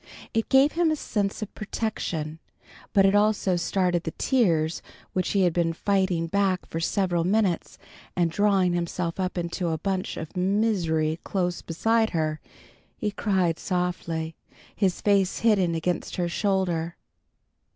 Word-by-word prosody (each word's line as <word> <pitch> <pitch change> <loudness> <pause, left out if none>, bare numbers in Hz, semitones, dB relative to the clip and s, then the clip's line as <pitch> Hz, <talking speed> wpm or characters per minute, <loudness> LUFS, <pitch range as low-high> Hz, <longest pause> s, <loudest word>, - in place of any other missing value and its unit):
It 225 0 0
gave 270 +2 +5
him 335 -1 +2
a 310 - +2
sense 205 -7 -2
of 215 - -8
protection, 170 -8 -3 0.5
but 195 -1 +5
it 195 - +4
also 205 -3 +3
started 175 0 +1
the 160 - -6
tears 170 - +2 0.3
which 185 - 0
he 200 -2 +3
had 175 -2 +3
been 165 -1 +1
fighting 190 -2 +1
back 190 +1 0
for 165 - -4
several 175 0 +1
minutes, 190 -1 0 0.4
and 170 -2 +2
drawing 195 -1 +3
himself 170 0 -2
up 185 0 -2
into 175 +1 -2
a 160 -1 0
bunch 190 +3 -2
of 160 +4 -7
misery 180 -5 +1
close 180 -3 -1
beside 225 +7 +1
her, 155 -1 -1 0.6
he 210 - -2
cried 190 -6 0
softly, 170 -3 -2 0.4
his 190 -3 0
face 200 -2 +2
hidden 195 -7 +3
against 175 +2 -2
her 175 -1 0
shoulder. 175 -3 0
180 Hz, 145 wpm, -26 LUFS, 170-200 Hz, 0.6 s, gave